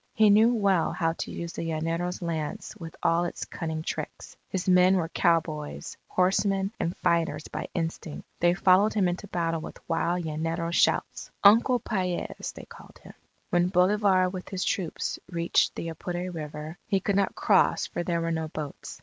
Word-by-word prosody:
He 215 Hz, -2 st, +6 dB
knew 220 Hz, +3 st, +6 dB
well 195 Hz, -6 st, +2 dB
how 165 Hz, -2 st, 0 dB
to -, -, -5 dB
use 170 Hz, 0 st, -5 dB
the -, -, -5 dB
llanero's 165 Hz, +2 st, -2 dB
lance 160 Hz, -3 st, -4 dB
with 165 Hz, -1 st, -9 dB
all 165 Hz, +1 st, +3 dB
its 175 Hz, -, -4 dB
cunning 160 Hz, -2 st, -4 dB
tricks. -, -, -6 dB
His 190 Hz, -1 st, -3 dB
men 180 Hz, +1 st, +6 dB
were 165 Hz, -3 st, 0 dB
cowboys, 160 Hz, -4 st, 0 dB
horsemen, 195 Hz, +1 st, +1 dB
and 170 Hz, -, -2 dB
fighters 170 Hz, -3 st, +1 dB
by -, -, -5 dB
instinct. 165 Hz, -2 st, -4 dB
They 175 Hz, +1 st, +3 dB
followed 190 Hz, +4 st, +4 dB
him 195 Hz, -4 st, +3 dB
into 180 Hz, +3 st, -3 dB
battle 165 Hz, -3 st, -1 dB
with -, -, -8 dB
wild 170 Hz, +1 st, 0 dB
llanero 165 Hz, +2 st, -2 dB
shouts. -, -, +1 dB
Uncle 230 Hz, +5 st, +6 dB
Paez, 185 Hz, -6 st, -3 dB
they -, -, -10 dB
called -, -, -14 dB
him, -, -, -12 dB, 0.4 s
When 175 Hz, 0 st, +3 dB
Bolivar 185 Hz, 0 st, +3 dB
with 185 Hz, 0 st, -6 dB
his 190 Hz, -1 st, -2 dB
troops 185 Hz, -6 st, -2 dB
reached 170 Hz, -1 st, +1 dB
the 165 Hz, -, -4 dB
Apure 175 Hz, +3 st, -4 dB
River, 155 Hz, 0 st, -7 dB
he 195 Hz, -, +2 dB
could 200 Hz, +1 st, -1 dB
not 200 Hz, -1 st, +1 dB
cross -, -, +3 dB
for -, -, -4 dB
there 170 Hz, -1 st, -1 dB
were 165 Hz, 0 st, -1 dB
no 160 Hz, -1 st, -2 dB
boats. 155 Hz, -2 st, -7 dB
175 Hz, 175 wpm, -27 LUFS, 165-190 Hz, 0.4 s, He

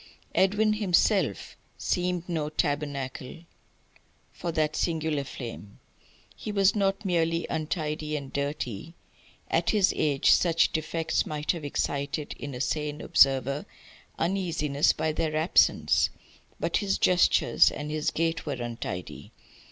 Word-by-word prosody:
Edwin 210 Hz, +3 st, +3 dB
himself 205 Hz, -5 st, +1 dB, 0.2 s
seemed 180 Hz, -1 st, -1 dB
no 160 Hz, -4 st, -2 dB
tabernacle 145 Hz, -1 st, -3 dB, 0.9 s
for 170 Hz, -, -4 dB
that 155 Hz, -2 st, 0 dB
singular 160 Hz, -3 st, -1 dB
flame. 115 Hz, -6 st, -8 dB, 0.6 s
He 215 Hz, -, -6 dB
was 200 Hz, -1 st, +3 dB
not 195 Hz, 0 st, 0 dB
merely 165 Hz, -2 st, +1 dB
untidy 155 Hz, -1 st, -2 dB
and 140 Hz, -2 st, -8 dB
dirty 140 Hz, -, -4 dB, 0.5 s
at -, -, +1 dB
his 205 Hz, -3 st, +3 dB
age 145 Hz, -3 st, +2 dB
such 165 Hz, -2 st, +4 dB
defects 160 Hz, +1 st, -1 dB
might 150 Hz, -1 st, -1 dB
have 170 Hz, -4 st, -6 dB
excited 140 Hz, +1 st, -2 dB
in 140 Hz, -2 st, -6 dB
a 125 Hz, -, -4 dB
sane 150 Hz, 0 st, -2 dB
observer 135 Hz, +1 st, +3 dB, 0.5 s
uneasiness 165 Hz, -5 st, +1 dB
by 155 Hz, -, -1 dB
their 155 Hz, 0 st, -2 dB
absence; 160 Hz, +3 st, +3 dB, 0.5 s
but -, -, 0 dB
his 200 Hz, -2 st, 0 dB
gestures 180 Hz, -1 st, +4 dB
and 150 Hz, 0 st, -6 dB
his 155 Hz, 0 st, 0 dB
gait 165 Hz, 0 st, -1 dB
were 145 Hz, -, -3 dB
untidy. 120 Hz, -7 st, -6 dB
155 Hz, 120 wpm, -27 LUFS, 145-170 Hz, 0.9 s, such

